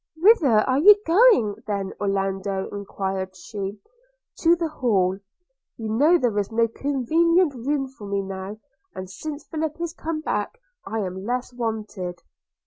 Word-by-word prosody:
'Whither 315 - +5
are 260 +1 +2
you 410 +7 +9
going, 335 - +5
then, 200 -2 -2
Orlando?' 195 -1 -1
enquired 190 -2 -4
she. 195 +2 -6 0.6
'To 335 0 +5
the 335 -1 -2
Hall 200 -11 +1 0.3
– - - -56
You 220 -2 -5
know 295 +11 +4
there 235 -8 0
is 200 +2 -3
no 230 +1 +2
convenient 305 +7 +2
room 270 +3 -1
for 255 -6 -11
me 200 0 -1
now; 195 +2 -6 0.4
and 185 - -6
since 290 +11 -7
Philip 315 0 -3
is 340 -1 -3
come 325 -2 -4
back, 305 - -3 0.3
I 220 0 -2
am 190 -1 -5
less 245 +3 -3
wanted.' 215 -7 -4
225 Hz, 150 wpm, -24 LUFS, 195-310 Hz, 0.6 s, you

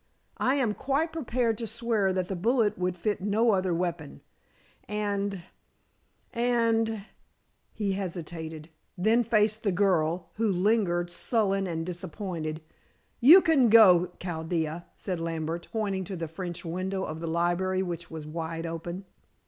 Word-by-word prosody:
I 260 - +2
am 245 -7 +1
quite 280 +8 -1
prepared 245 -7 -1
to 230 - -3
swear 220 -3 0
that 185 -1 -1
the 195 - -3
bullet 225 +3 +2
would 180 0 -1
fit 205 +3 -2
no 215 +4 +2
other 190 -2 +1
weapon. 170 -3 -3 0.7
And 200 -2 -2 0.9
and" 230 -3 +1 0.7
he 205 -2 -2
hesitated, 165 -4 -5 0.3
then 220 +6 +3
faced 215 -1 +2
the 200 - +1
girl, 175 -3 +1
who 220 -2 +2
lingered, 180 -3 +1
sullen 195 -1 0
and 165 -2 -3
disappointed. 170 -3 -5 0.6
"You 320 +10 +9
can 285 -8 +4
go, 185 -6 +7
Chaldea," 160 -1 -3
said 185 -3 -3
Lambert, 165 0 -3
pointing 200 -4 -1
to 190 - -5
the 165 -2 -4
French 175 +2 -6
window 185 +3 -2
of 155 -2 -5
the 165 - -4
library, 175 +3 0
which 170 -2 -5
was 160 -2 -7
wide 165 +1 -4
open. 170 +3 -5
185 Hz, 140 wpm, -28 LUFS, 170-220 Hz, 0.9 s, You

